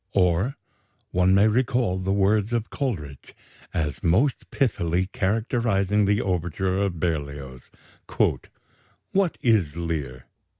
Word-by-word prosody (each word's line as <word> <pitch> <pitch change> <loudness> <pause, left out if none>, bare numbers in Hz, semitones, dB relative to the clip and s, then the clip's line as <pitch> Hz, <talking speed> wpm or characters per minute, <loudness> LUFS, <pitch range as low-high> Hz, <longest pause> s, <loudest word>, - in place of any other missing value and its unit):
Or 95 - +2 0.5
one 90 +1 +3
may 100 +2 +5
recall 120 -4 +1
the 95 +1 -1
words 100 +3 +2
of 115 -2 -2
Coleridge 80 - -4 0.4
as 75 -4 -2
most 115 - +1
pithily 95 -7 0
characterizing 105 -2 +1
the 105 +1 +2
overture 90 +1 -1
of 95 -4 -1
Berlioz: 70 -6 -4 1.4
"What 190 -3 +1
is 95 - +2
Lear? 75 -7 -4
95 Hz, 110 wpm, -24 LUFS, 85-110 Hz, 1.4 s, may